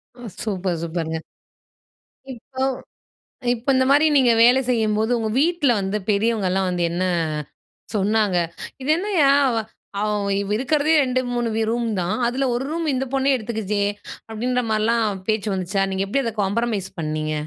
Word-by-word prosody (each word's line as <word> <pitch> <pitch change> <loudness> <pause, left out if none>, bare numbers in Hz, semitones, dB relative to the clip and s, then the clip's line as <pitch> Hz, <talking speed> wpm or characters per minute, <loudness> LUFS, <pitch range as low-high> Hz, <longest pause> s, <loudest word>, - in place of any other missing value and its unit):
ம், 245 -2 -9
சூப்பர் 185 -5 -2
சூப்பர்ங்க. 160 -1 -3 1.2
இப்போ, 260 +2 -6 0.9
இப்போ 240 +3 -5
இந்த 260 0 +3
மாரி 295 +2 +5
நீங்க 245 -3 +5
வேல 245 +3 +6
செய்யும்போது 220 -1 +1
உங்க 220 -1 -1
வீட்டுல 325 -5 +2
வந்து 195 +2 -1
பெரியவங்கள்லாம் 200 -3 +1
வந்து 175 -1 -1
என்ன 180 +2 -1 0.9
சொன்னாங்க? 205 -1 +2 0.4
"இது 265 - -4
என்னய்யா! 350 -8 +3 0.2
அவ 230 - -1 0.4
அவ் 200 -1 -1
இருக்குறதே 290 +5 +1
2,3 245 -2 -1
வி 225 - +1
ரூம் 235 0 -1
தான். 175 +1 -1
அதுல 265 +3 0
ஒரு 245 +2 -1
ரூம் 330 0 -2
இந்த 265 +1 -1
பொண்ணே 270 +1 +2
எடுத்துக்குச்சே!" 215 -3 -2 0.5
அப்படின்ற 245 +3 -1
மாதிரிலாம் 215 -2 +1
பேச்சு 215 -1 0
வந்துச்சா? 190 +1 -1
நீங்க 190 +1 -1
எப்படி 275 +7 0
அத 230 - -2
காம்பரமைஸ் 205 -1 -1
பண்ணீங்க? 155 -1 -2
220 Hz, 140 wpm, -22 LUFS, 195-255 Hz, 1.2 s, வேல